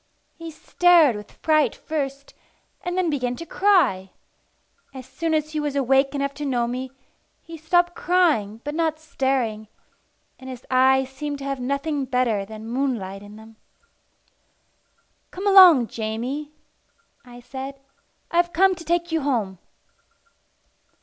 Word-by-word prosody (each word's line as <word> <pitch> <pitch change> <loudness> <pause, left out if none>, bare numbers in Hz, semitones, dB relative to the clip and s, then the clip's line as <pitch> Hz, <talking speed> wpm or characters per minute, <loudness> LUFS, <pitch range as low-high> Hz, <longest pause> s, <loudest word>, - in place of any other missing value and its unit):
He 330 0 -8
stared 325 -3 +3
with 210 0 -9
fright 310 -2 +2
first, 280 -2 -5 0.5
and 355 0 -3
then 360 -3 +1
began 250 -4 -2
to 335 - -8
cry. 315 - +2 0.9
As 260 -1 -8
soon 320 +5 -2
as 305 0 -1
he 310 - -2
was 295 -2 -3
awake 270 +1 +2
enough 280 0 -2
to - - -2
know 245 -4 0
me, 255 +2 -4 0.5
he 330 - -11
stopped 350 +2 +1
crying 305 - +1
but 295 - -4
not 320 -1 0
staring, 260 -8 -2 0.7
and 260 0 -10
his 255 -1 -9
eyes 265 +1 +4
seemed 290 +1 -5
to 275 - -9
have 275 -1 -3
nothing 280 +2 -2
better 245 -6 0
than 220 +1 -10
moonlight 230 -7 -3
in 205 +1 -13
them. 220 0 -15 1.7
"Come 380 +3 -7
along, 370 -10 +8
Jamie," 235 +7 -4 0.7
I 245 -1 -13
said. 270 +2 -8 0.5
"I'm 345 +1 +3
come 370 +3 +2
to 345 -2 -9
take 345 +1 -1
you 320 -1 0
home." 220 -10 -2
275 Hz, 140 wpm, -23 LUFS, 245-320 Hz, 1.7 s, along